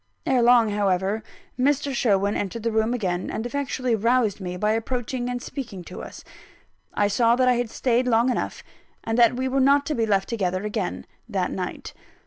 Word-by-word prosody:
Ere 260 -2 +3
long, 235 -2 +5
however, 200 +1 0 0.4
Mr. 280 +1 +1
Sherwin 205 -4 +1
entered 210 +3 -3
the 230 - 0
room 220 +1 +1
again, 185 -7 -2
and 220 - -4
effectually 255 -1 -2
roused 225 -1 +1
me 180 -1 -4
by 210 +3 +1
approaching 245 +2 -2
and 245 0 -2
speaking 235 -8 -7
to - - -9
us. - - -10 0.7
I 205 - +1
saw 230 +3 +3
that 255 0 +2
I 250 - +5
had 240 -1 -1
stayed 250 +1 +1
long 235 +1 +3
enough, - - -3 0.4
and 225 - -2
that 235 0 +5
we 260 +1 -1
were 265 +1 0
not 280 +2 +4
to 305 - -1
be 230 -5 0
left 195 -2 +1
together 185 -4 -1
again, 90 - -3 0.2
that - - -1
night. - - -5
230 Hz, 190 wpm, -24 LUFS, 205-250 Hz, 0.7 s, long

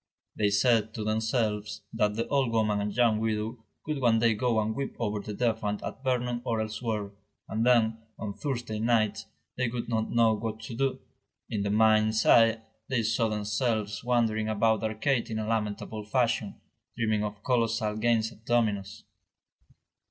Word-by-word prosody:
They 105 -1 +2
said 110 +1 +2
to 110 - -3
themselves 110 -1 -1
that 105 -2 +1
the 115 - -2
old 135 -4 +1
woman 105 -2 +1
and 105 0 -2
young 115 0 +3
widow 110 +1 -2 0.2
would 150 -2 -2
one 115 -2 +4
day 115 0 +3
go 115 +1 +1
and 110 0 0
weep 135 +3 -4
over 105 -2 -1
the 105 0 -6
defunct 110 -3 -1
at - - -6
Vernon 125 -2 0
or 115 -2 -1
elsewhere, 110 -1 -3 0.4
and 110 +1 -1
then, 115 -2 +3 0.2
on 105 -2 -4
Thursday 120 -4 -3
nights, 110 -2 +1 0.3
they 125 -1 +1
would 120 0 -4
not 110 -1 0
know 115 -1 +4
what 110 0 -4
to 110 - -7
do. 135 +2 -1 0.5
In 105 - -1
the 100 - -1
mind's 110 +1 +3
eye 115 -1 +5 0.3
they 125 -3 +1
saw 110 +1 +1
themselves 105 0 -1
wandering 115 -3 +1
about 110 +1 +2
the 110 - -1
arcade 120 +3 0
in 110 - -3
a 110 - -2
lamentable 110 -1 -2
fashion, 115 -2 0 0.4
dreaming 110 -2 +1
of 105 -1 -5
colossal 115 -3 +1
games 110 0 +1
at 110 - -18
dominoes. 110 -3 0
110 Hz, 170 wpm, -28 LUFS, 105-115 Hz, 0.5 s, eye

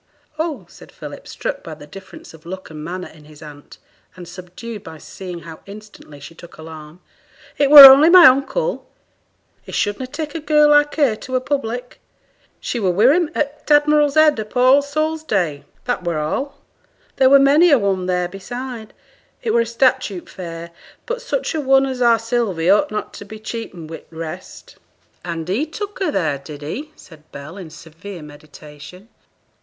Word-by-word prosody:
'Oh,' 305 - -3
said - - -16
Philip, - - -11
struck - - -5
by - - -8
the 145 - -13
difference 185 +3 -13
of 160 -1 -16
look 185 0 -9
and 155 -1 -9
manner 180 +3 -6
in 155 -2 -18
his 150 +1 -15
aunt, 145 -1 -13 0.4
and 175 -2 -11
subdued 185 +5 -10
by 160 -4 -11
seeing 180 +2 -9
how 165 0 -11
instantly 205 -8 -13
she 145 - -12
took 170 +1 -15
alarm. 160 +1 -12 0.6
'It 285 -1 +3
were 290 -1 +13
only 275 +4 +9
my 355 -1 +8
uncle; 315 - +1 0.7
he - - -13
should 205 0 -2
na' 260 - -5
take 300 +2 -6
a 330 - -4
girl 300 -1 +3
like 295 0 +3
her 280 -8 +2
to 255 - -6
a - - +2
public. 250 -2 -4 0.6
She 240 - -4
were 195 -4 0
wi' 220 - +4
him 345 -3 0
at 295 0 -4
t' 295 - +6
"Admiral's 295 -1 +2
Head" 310 -5 +4
upo' 215 +3 -4
All 260 +3 +5
Souls' 310 +2 -3
Day 175 - -2 0.2
that 245 -7 -2
were 170 -2 -2
all. 270 - -3 0.6
There 260 -1 +4
were 275 - +7
many 285 +6 +4
a 285 - +5
one 195 -4 -1
there 180 -1 -1
beside, 230 +4 -8 0.5
it 230 - -1
were 230 0 +2
statute 235 -5 0
fair; 170 -2 -9 0.3
but - - -4
such - - -3
a 315 - -2
one 270 0 +3
as 260 -2 -5
our 235 -1 +4
Sylvie 225 -7 -1
ought 205 - +3
not 215 0 -5
to - - -10
be 215 +2 -11
cheapened 190 -8 -8
wi' 165 - -6
t' - - -26
rest.' 160 -1 -9 0.5
'And 170 -2 -5
he 225 - -1
took 410 +5 -7
her 380 - -1
there, 160 -8 -1
did 145 +1 -11
he?' 275 - -6
said 155 -2 -18
Bell, 140 +5 -10
in 185 -5 -10
severe 165 +3 -11
meditation. 150 +4 -14
215 Hz, 185 wpm, -19 LUFS, 170-280 Hz, 0.7 s, were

